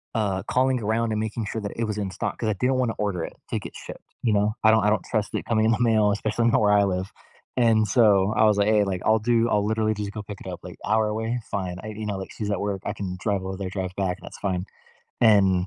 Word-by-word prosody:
uh, 100 -3 0
calling 130 0 +1
around 110 +2 0
and 110 - -1
making 110 0 -3
sure 110 - -3
that 100 - -5
it 115 - -1
was 105 -1 -3
in 100 -2 -3
stock- - - -3
'cause 110 - -2
I - - +2
didn't 125 +7 0
wanna 125 -3 +1
order 95 -5 -1
it - - -6 0.2
to - - -1
get - - -9
shipped, - - -11
you 110 -3 +1
know? 105 +1 +1
I 110 - +7
don't 110 -2 +4
I 105 - +4
don't 110 - +1
trust 110 -3 -2
it - - -3
coming 110 -2 +2
in 115 - +4
the 115 - +1
mail, 110 -3 +4
especially 110 +3 0
not 115 - +3
where 105 0 +4
I 100 0 +5
live- 95 0 -2 0.5
and 110 -3 +4
so, 105 -2 +4
I 110 - +4
was 105 -1 +4
like, 100 0 +2
"Hey, 105 -1 +4
like, 95 -2 -2
I'll 110 0 +4
do 115 +1 +2
I'll 105 -1 +2
literally 110 0 +1
just 105 -1 -4
go 105 0 -6
pick 100 0 -9
it - - -9
up, - - -6
like, - - -9
hour 110 +1 +2
away? 110 +3 -2
Fine." 90 -3 -3
I - - -6
you 110 0 -6
know, 100 -2 -2
like, 95 - -7
she's 105 -2 -4
at 100 - -1
work. 100 -2 -2
I - - -2
can 90 -2 -5
drive 100 -2 -1
over 95 0 -5
there, 95 -2 -4
drive 95 -1 -3
back, 95 -2 -1
that's - - -11
fine. 95 -2 -2 0.6
And, 95 -5 +4
105 Hz, 285 wpm, -25 LUFS, 100-110 Hz, 0.6 s, I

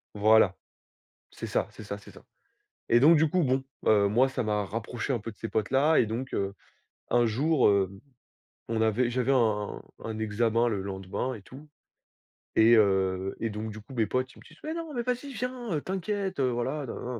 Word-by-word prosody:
Voilà, 105 -2 +5 0.8
c'est - - -7
ça, - - 0
c'est - - -11
ça, 100 -1 -5
c'est 100 - -14
ça. - - -16 0.7
Et 120 - +5
donc, 160 +5 +7
du 155 0 +3
coup, 180 +2 +1
bon, 130 -1 +1 0.2
heu, 100 -2 +5
moi, 125 +6 +3
ça 130 - -2
m'a 105 -1 0
rapproché 115 +5 -4
un 120 - 0
peu 115 +2 -7
de 105 - -16
ces 115 - -5
potes 110 0 -1
là, 145 +4 +4
et 115 - +4
donc, 120 +4 -4
heu, 100 0 -1 0.6
un 120 0 +3
jour, 135 +6 +2
heu, 100 -2 +3 0.8
on 110 -1 -1
avait 115 +3 +2
j'avais 125 +2 +1
un 110 -5 +1 0.2
un 110 -1 -4
examen 115 +2 +1
le 100 -4 -1
lendemain 95 +6 -4
et 105 - -10
tout 135 +9 -13 0.9
et 115 +2 +6
heu, 95 -2 +2
et 115 - -1
donc, 110 +1 -5
du 110 - -9
coup, 120 - -13
mes 115 -3 +1
potes, 130 +5 -2
ils - - -16
me - - -15
disent: 155 - -17
«Mais 315 +1 -3
non, 330 -2 -5
mais 240 - -1
vas-y, 250 +3 -3
viens, 250 -5 -4
heu, 150 - -1
t'inquiète, 190 -1 -3
voilà, 130 +3 -1
nin, 120 0 -5
120 Hz, 205 wpm, -28 LUFS, 105-140 Hz, 0.9 s, donc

